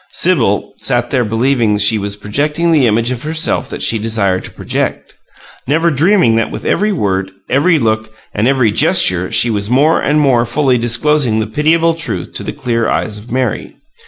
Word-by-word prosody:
Sibyl 130 - 0
sat - - 0
there 125 - +1
believing 115 0 0
that 105 - +2
she 110 +1 +3
was 100 0 -3
projecting 150 +11 -1
the 145 -6 +3
image 115 +3 +1
of 125 -2 -4
herself 155 +1 -2
that - - -5
she 115 - +2
desired 105 -4 -1
to - - -9
project, - - -4 0.5
never 165 +4 +1
dreaming 150 - +3
that 115 - 0
with - - -8
every 210 +1 +1
word, 95 - -1 0.2
every 155 +6 +3
look, 110 -4 -1 0.2
and 105 +3 0
every 130 -5 +2
gesture 90 -2 +2
she 120 - +2
was 100 -1 -2
more 145 +6 +2
and 150 +2 +1
more 130 -5 +3
fully 130 +1 0
disclosing 120 +1 +1
the 110 - 0
pitiable 160 +8 +1
truth 165 0 -5
to - - -5
the - - -5
clear 120 -5 -2
eyes 105 -1 -2
of 110 +3 -13
Mary. 125 -2 -3
120 Hz, 190 wpm, -14 LUFS, 110-150 Hz, 0.5 s, she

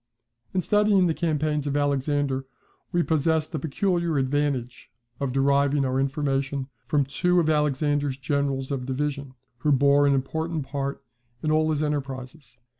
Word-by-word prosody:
In 185 - 0
studying 210 0 +3
the 165 - +2
campaigns 155 -3 -1
of 145 0 0
Alexander, 140 -1 0 0.4
we 175 0 +2
possess 160 0 +1
the 160 - -4
peculiar 170 +2 0
advantage 135 -2 -1 0.3
of 140 -2 -1
deriving 140 +1 +2
our 130 0 0
information 135 0 -1 0.2
from 145 -2 +2
two 180 +6 +1
of 160 -2 +2
Alexander's 145 -2 +1
generals 140 0 -1
of 130 -2 -3
division, 140 0 -3 0.2
who 150 +3 +1
bore 140 +1 +4
an 140 - +4
important 160 +3 -2
part 140 0 -4 0.4
in 155 - +1
all 155 0 +3
his 155 -1 0
enterprises. 135 -2 -5
145 Hz, 145 wpm, -25 LUFS, 135-155 Hz, 0.4 s, bore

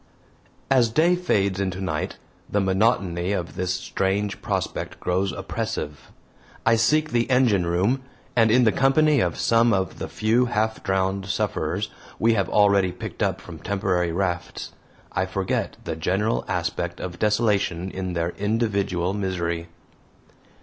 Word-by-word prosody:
As 125 -4 +5
day 165 +9 +3
fades 100 - +1
into 95 -1 -2
night 85 -5 -3 0.3
the 105 - +1
monotony 95 -2 +1
of 90 -4 -3
this 90 0 -2
strange 95 +2 -1
prospect - - -3
grows 95 +2 0
oppressive. 75 -3 -5 0.5
I 115 - +5
seek 155 +7 +2
the 120 +1 +1
engine 120 -9 +3
room, 95 +10 +1 0.3
and 115 -2 +5
in 125 +3 +5
the 110 - +5
company 140 +3 +4
of 90 -6 0
some 115 0 +3
of 95 -3 -1
the - - -3
few 115 +3 +2
half 110 -1 0
drowned 95 0 0
sufferers 95 - -1 0.3
we 115 +1 +3
have 100 -3 0
already 100 -3 +4
picked 90 - -8
up - - +1
from - - -10
temporary 90 -4 0
rafts, 90 0 -3 0.4
I 95 - 0
forget 95 0 -2
the 80 - -3
general 95 +8 0
aspect 90 0 -2
of 90 -1 -6
desolation 105 -5 +1
in 95 -1 -4
their 85 0 0
individual 100 -4 0
misery. 85 -4 -2
100 Hz, 145 wpm, -24 LUFS, 90-115 Hz, 0.5 s, As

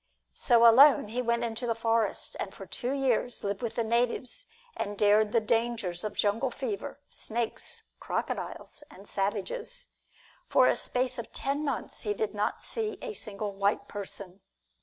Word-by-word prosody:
So 235 -2 +5
alone 260 -1 +7
he 245 +3 -1
went 235 -1 +1
into 235 +1 -2
the 230 - +1
forests, 230 -1 +1
and - - -5
for - - -8
two 250 +1 -3
years 255 -3 +1
lived 200 0 -2
with 230 -2 -3
the 235 - +1
natives 240 - 0 0.3
and 205 0 -3
dared 210 +1 +4
the 230 - +4
dangers 225 -5 0
of 210 -1 -3
jungle 225 +6 +1
fever, 255 +2 -4
snakes, 230 0 -3 0.2
crocodiles 295 - -3
and 195 +2 -13
savages. 430 - -2 0.6
For - - +5
a - - +4
space 250 0 -1
of 230 - -6
ten 280 +2 -1
months 280 -5 -2
he 210 -1 -1
did 215 +1 -1
not 210 0 -1
see 435 -2 -2
a 460 - -4
single 210 - -5
white 200 +1 0
person. 200 -2 -6
230 Hz, 160 wpm, -29 LUFS, 205-250 Hz, 0.6 s, alone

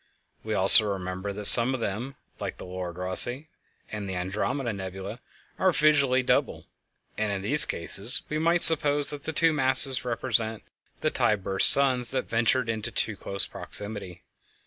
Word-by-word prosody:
We 110 -1 -6
also 100 +2 +7
remember 95 +1 -8
that 105 +1 -6
some 120 +5 +8
of - - -9
them, 115 +6 -7 0.2
like - - -8
the - - -12
Lord 90 -1 -10
Rosse 110 +10 +2 0.5
and 105 -2 -8
the 95 - -7
Andromeda 105 +8 -6
nebulæ, 95 +3 -10 0.4
are 190 - 0
visually 140 -5 -1
double, - - -3 0.5
and 110 -1 -4
in 95 -1 -7
these 145 +9 +5
cases 105 - -2
we 155 - -6
might 170 +2 0
suppose 145 -2 +3
that 145 -1 -12
the - - -6
two 165 +1 -1
masses 130 -2 0
represent 115 -2 -4 0.4
the - - -3
tide 105 -3 -3
burst 95 0 +4
suns 130 -3 0
that 130 -1 -6
ventured 120 +2 -2
into 110 -2 -6
too 110 - -5
close 100 0 0
proximity. 100 -4 -9
115 Hz, 165 wpm, -23 LUFS, 100-135 Hz, 0.5 s, some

